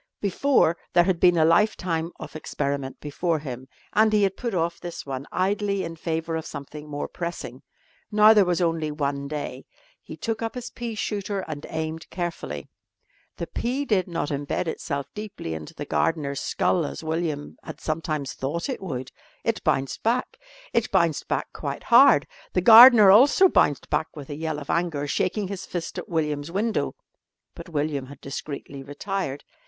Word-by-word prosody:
Before 200 - +2 0.2
there 175 - +6
had 180 -1 0
been 175 -1 +5
a 160 - +5
lifetime 170 -2 +2
of - - -9
experiment 140 -3 -3
before 160 +3 -1
him, 130 -3 -7 0.3
and 220 0 +4
he 210 -1 +3
had 195 -1 +1
put 235 -5 -3
off 170 0 -1
this 175 -1 -7
one 135 0 -5
idly 200 +1 0
in 165 -1 -5
favour 165 0 -2
of 160 - -4
something 150 +2 -8
more 145 0 -3
pressing. 170 -7 -6 0.5
Now 215 +1 +7
there 210 -2 +6
was 180 -1 0
only 165 -2 0
one 140 -2 -2
day. 150 0 -5 0.4
He - - -10
took 225 -1 -3
up 225 +1 -3
his 245 -1 -6
pea 235 -2 -5
shooter 205 -1 -2
and 155 -4 -7
aimed 160 0 -4
carefully. 175 -1 -4 0.7
The - - -3
pea 260 +4 -2
did 195 -8 +1
not 165 -4 -2
embed 145 +4 -2
itself 140 -3 -3
deeply 210 - -6
into 80 -1 -8
the - - -5
gardener's 140 - 0
skull 175 - +1
as 150 - -5
William 160 -2 -3
had - - -9
sometimes 155 -3 -3
thought 155 - -3
it 260 - -3
would. 130 -8 -5 0.3
It - - -1
bounced 135 0 0
back. 240 +3 -1 0.3
It - - +1
bounced - - +1
back - - -2
quite - - -5
hard. - - +7 0.3
The 180 - +2
gardener 225 -1 +10
also 280 - +7
bounced 145 - +2
back 160 - +1
with 145 -2 -8
a - - -4
yell 160 0 -3
of 145 -1 -4
anger, 165 -4 0
shaking 190 +7 -1
his 190 -1 -6
fist 175 -2 -4
at - - -9
William's 150 -2 -1
window. 215 +5 -1 0.6
But - - -10
William 145 -4 -2
had 140 0 -12
discreetly 140 0 -7
retired. 145 +1 -4
165 Hz, 175 wpm, -25 LUFS, 145-195 Hz, 0.7 s, gardener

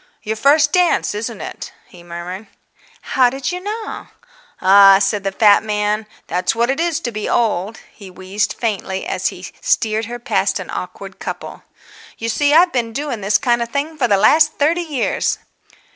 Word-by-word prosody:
"Your 220 -1 -2
first 290 +6 +3
dance, 360 - +2
isn't 215 -2 -5
it?" - - -8
he 175 - -16
murmured. 175 +4 -8 0.7
"How 255 -2 +5
did 270 +4 -4
you 360 - -4
know?" 425 +3 -6 0.5
"Ah," 195 +1 +7
said 195 +1 0
the 195 - -1
fat 205 +1 +5
man, 210 0 -1 0.2
"that's 180 +4 -1
what 235 +3 +1
it 275 - -3
is 335 -2 0
to 240 - -3
be 215 -1 -4
old!" 220 -2 0 0.2
He 200 -3 -12
wheezed 190 +3 -3
faintly 195 -4 -3
as - - -1
he - - -6 0.2
steered 225 - +1
her 240 +2 -6
past 240 +2 0
an - - -7
awkward - - -7
couple. - - -7 0.6
"You 230 - -3
see, 290 +5 +1
I've 345 +4 +5
been 235 -3 -1
doing 275 -4 -4
this 195 +1 +3
kind 240 +1 +1
of 235 - -3
thing 290 +5 -3
for 270 -5 +1
the 200 -3 +3
last 305 +9 +4
thirty 320 +4 +1
years." 300 -7 -1
230 Hz, 180 wpm, -18 LUFS, 200-285 Hz, 0.7 s, Ah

